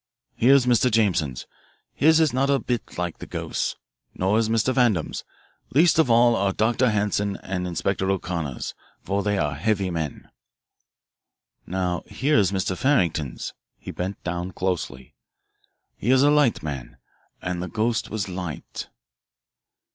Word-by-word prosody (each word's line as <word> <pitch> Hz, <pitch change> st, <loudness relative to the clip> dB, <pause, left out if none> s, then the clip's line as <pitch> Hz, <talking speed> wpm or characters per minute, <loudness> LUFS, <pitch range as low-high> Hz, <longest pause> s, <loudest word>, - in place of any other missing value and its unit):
"Here 130 Hz, +4 st, +5 dB
is 135 Hz, -3 st, +4 dB
Mr. 125 Hz, 0 st, +4 dB
Jameson's 90 Hz, -, +1 dB, 0.5 s
his 160 Hz, +2 st, +4 dB
is 155 Hz, -5 st, +3 dB
not 135 Hz, +2 st, +1 dB
a 140 Hz, -, +4 dB
bit 125 Hz, -3 st, -4 dB
like 90 Hz, -1 st, -3 dB
the -, -, -8 dB
ghost's. -, -, -3 dB, 0.4 s
Nor 95 Hz, +4 st, +2 dB
is 110 Hz, -1 st, +1 dB
Mr. 115 Hz, +3 st, +2 dB
Vandam's. 115 Hz, -, +1 dB, 0.5 s
Least 165 Hz, +2 st, +5 dB
of 160 Hz, -, +4 dB
all 120 Hz, 0 st, +5 dB
are 100 Hz, -2 st, +1 dB
Dr. 120 Hz, +4 st, +2 dB
Hanson's 105 Hz, -1 st, 0 dB
and 90 Hz, -1 st, -3 dB
Inspector 95 Hz, +2 st, -1 dB
O'Connor's, 85 Hz, -8 st, -3 dB, 0.3 s
for 100 Hz, +1 st, -1 dB
they 105 Hz, 0 st, 0 dB
are 75 Hz, -5 st, 0 dB
heavy 95 Hz, +5 st, 0 dB
men. 80 Hz, -4 st, -4 dB, 1.4 s
"Now 90 Hz, -1 st, -1 dB
here 140 Hz, -2 st, +2 dB
is 100 Hz, -2 st, +2 dB
Mr. 95 Hz, -1 st, -1 dB
Farrington's" 85 Hz, -, 0 dB, 0.2 s
he -, -, -8 dB
bent 95 Hz, +3 st, -5 dB
down 90 Hz, +1 st, -3 dB
closely, 85 Hz, -9 st, -3 dB, 0.8 s
"he 115 Hz, -, -3 dB
is 130 Hz, +1 st, +5 dB
a 145 Hz, -, +5 dB
light 145 Hz, -, +3 dB
man, 70 Hz, -5 st, -6 dB, 0.4 s
and 90 Hz, -1 st, -3 dB
the 90 Hz, -, -3 dB
ghost 110 Hz, +5 st, -1 dB
was 105 Hz, -2 st, -3 dB
light." 90 Hz, -4 st, -6 dB
100 Hz, 145 wpm, -24 LUFS, 90-120 Hz, 1.4 s, Here